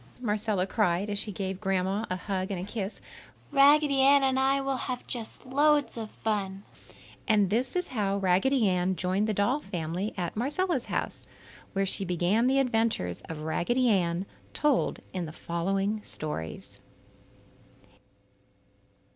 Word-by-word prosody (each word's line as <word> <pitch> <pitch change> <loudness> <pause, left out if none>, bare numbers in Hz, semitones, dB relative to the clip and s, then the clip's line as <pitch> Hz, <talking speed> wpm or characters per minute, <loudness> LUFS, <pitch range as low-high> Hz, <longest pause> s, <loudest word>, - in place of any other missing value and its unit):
Marcella 210 -4 0
cried 195 -1 0
as 205 - 0
she 210 - +2
gave 190 0 -4
Grandma 195 +1 0
a 185 - -1
hug 190 0 -3
and 190 -1 -4
kiss. 205 -2 -5 0.5
"Raggedy 285 0 +5
Ann 275 +1 +6
and 265 0 +2
I 270 +1 +3
will 270 -1 -1
have 250 -1 -4
just 235 0 -4
loads 290 +2 +2
of 225 -2 -5
fun." 200 -3 -3 0.6
And 205 -5 +3
this 245 - 0
is 360 0 -1
how 200 -5 0
Raggedy 200 +6 +3
Ann 185 0 +1
joined 185 +5 0
the 215 - 0
doll 220 +9 +2
family 180 - -4
at 175 -2 -3
Marcella's 290 - 0
house, - - -3 0.5
where 195 0 +1
she 195 - +2
began 180 +6 +1
the 265 +1 +3
adventures 225 - 0
of 160 -2 -6
Raggedy 240 +11 +1
Ann, 175 -2 +1 0.3
told 295 -4 +1
in 180 -3 -3
the - - -7
following 195 +6 -2
stories. 80 - -6
205 Hz, 145 wpm, -28 LUFS, 185-255 Hz, 0.6 s, Ann